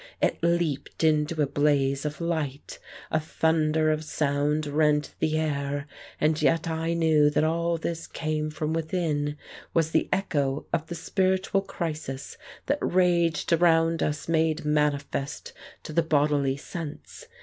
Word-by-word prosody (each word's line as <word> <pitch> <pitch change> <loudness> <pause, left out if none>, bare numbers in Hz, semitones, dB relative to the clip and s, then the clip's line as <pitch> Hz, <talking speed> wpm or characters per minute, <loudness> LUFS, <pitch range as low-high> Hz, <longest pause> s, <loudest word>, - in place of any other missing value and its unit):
It - - +1
leaped 170 -3 0
into 155 0 +2
a - - +3
blaze 140 -1 +1
of 150 0 -4
light, 160 -5 -3 0.3
a 155 - +2
thunder 155 0 +1
of 155 0 -1
sound 150 0 0
rent 150 0 +1
the 155 0 +1
air, 145 -2 -1 0.3
and 155 0 +2
yet 165 0 +2
I 165 +1 -1
knew 155 -3 +4
that 150 - +1
all 170 +1 +1
this 165 0 -4
came 155 -1 -2
from 155 +1 -3
within, 155 -3 -1 0.4
was 160 -1 +2
the 160 - +1
echo 145 -7 0
of 160 -1 0
the 170 - -5
spiritual 190 +2 +1
crisis 155 -7 -5 0.3
that 285 +2 0
raged 175 -3 +2
round 165 -1 +3
us 150 0 -2
made 160 -1 +1
manifest 150 -1 -1 0.3
to 155 - -7
the 170 - +4
bodily 145 -3 +1
sense. 165 - -8
155 Hz, 140 wpm, -26 LUFS, 150-165 Hz, 0.4 s, knew